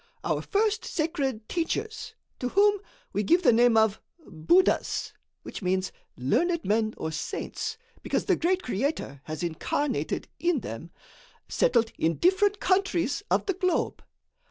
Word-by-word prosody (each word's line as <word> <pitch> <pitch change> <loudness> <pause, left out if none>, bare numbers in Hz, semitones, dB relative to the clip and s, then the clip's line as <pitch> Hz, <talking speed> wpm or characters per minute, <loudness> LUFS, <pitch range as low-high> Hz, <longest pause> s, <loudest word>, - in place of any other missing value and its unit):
Our - - 0
first 430 +1 0
sacred 280 - -2
teachers, 425 +6 -3 0.2
to 250 - -2
whom 410 +3 +4 0.3
we 205 - +1
give 345 - +3
the 240 - +6
name 235 0 +5
of 220 -1 +3 0.2
buddhas 200 - +1 0.3
which - - -7
means, 185 0 0 0.3
learned 335 - +1
men 220 +1 +1
or 160 - -3
saints 445 - -4 0.2
because - - -1
the 375 - +3
great 365 +3 0
Creator 235 - -2
has 155 +2 -5
incarnated 215 - -2
in 345 -7 +1
them, 115 +10 -7 0.6
settled 230 -2 +2
in 165 +1 +2
different 400 +3 +3
countries 370 -5 +1
of - - +2
the 390 - 0
globe. 365 -2 -1
290 Hz, 135 wpm, -27 LUFS, -, 0.6 s, the